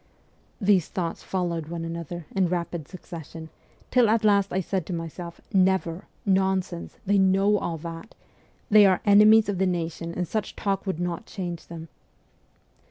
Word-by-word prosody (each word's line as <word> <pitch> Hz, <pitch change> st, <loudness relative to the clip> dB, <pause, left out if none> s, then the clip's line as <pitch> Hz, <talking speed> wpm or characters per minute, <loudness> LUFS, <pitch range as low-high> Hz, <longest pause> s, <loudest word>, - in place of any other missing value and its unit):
These 195 Hz, -5 st, +3 dB
thoughts 175 Hz, -4 st, -4 dB
followed 170 Hz, -4 st, -2 dB
one 165 Hz, 0 st, -5 dB
another 170 Hz, 0 st, -6 dB
in 190 Hz, -2 st, +3 dB
rapid 170 Hz, -3 st, -3 dB
succession, 165 Hz, -3 st, -9 dB, 0.4 s
till 245 Hz, -3 st, +4 dB
at 225 Hz, +1 st, +2 dB
last 200 Hz, -2 st, +3 dB
I 185 Hz, -, 0 dB
said 185 Hz, -2 st, -2 dB
to 185 Hz, -, -4 dB
myself: 170 Hz, +1 st, -6 dB
' -, -, -26 dB
Never! 190 Hz, -2 st, +2 dB, 0.2 s
Nonsense! 190 Hz, -2 st, 0 dB
They 200 Hz, +1 st, +3 dB
know 195 Hz, +2 st, +3 dB
all 165 Hz, -, -3 dB
that. 165 Hz, +5 st, -8 dB, 0.6 s
They 210 Hz, -1 st, +8 dB
are 185 Hz, -2 st, +2 dB
enemies 210 Hz, +2 st, +7 dB
of 200 Hz, -3 st, -2 dB
the 190 Hz, -, +2 dB
nation, 170 Hz, -1 st, -3 dB
and 180 Hz, -1 st, -2 dB
such 215 Hz, +3 st, -3 dB
talk 195 Hz, 0 st, -2 dB
would 185 Hz, -4 st, -2 dB
not 175 Hz, +4 st, -3 dB
change 175 Hz, -4 st, -6 dB
them.' 165 Hz, -1 st, -8 dB
185 Hz, 165 wpm, -25 LUFS, 170-195 Hz, 0.6 s, They